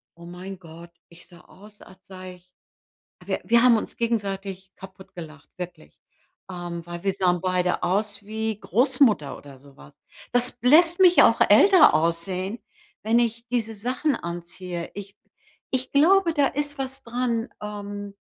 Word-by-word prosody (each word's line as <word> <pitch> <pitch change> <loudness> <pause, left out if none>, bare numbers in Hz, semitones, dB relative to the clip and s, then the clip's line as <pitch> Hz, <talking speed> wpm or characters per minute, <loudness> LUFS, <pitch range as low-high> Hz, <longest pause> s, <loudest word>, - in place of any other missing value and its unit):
oh 170 0 -14
mein 180 +3 -9
Gott, 170 0 -13 0.2
ich 170 0 -18
sah 175 0 -17
aus, 210 +3 -18
als 185 - -16
sei 185 -1 -10
ich 180 0 -25 0.8
wir - - -2
wir 235 0 +4
haben 245 -2 +6
uns - - -6
gegenseitig 195 -4 -3
kaputt 190 0 -14
gelacht, 155 -4 -11
wirklich. 175 - -9 0.5
Ähm, 175 -2 -7
weil 175 0 -8
wir 195 - 0
sahen 180 -2 +1
beide 180 -1 0
aus 205 +3 -1
wie 220 0 -4
Großmutter 245 - +1
oder 140 -2 -14
sowas. 135 - -18 0.4
Das 245 0 +1
lässt 330 +8 +5
mich 360 -1 +7
auch - - +4
älter 385 -4 +7
aussehen, 180 +6 -1 0.4
wenn 225 +2 +2
ich 230 0 -2
diese 230 -2 -2
Sachen 250 +7 -1
anziehe. 175 0 -7
Ich 200 0 -9 0.6
ich 260 0 -3
glaube, 340 +4 +4
da 290 -3 +3
ist 290 +1 -4
was 270 0 -6
dran. 235 0 -2
Ähm, 205 -1 -7
200 Hz, 150 wpm, -24 LUFS, 180-245 Hz, 0.8 s, mich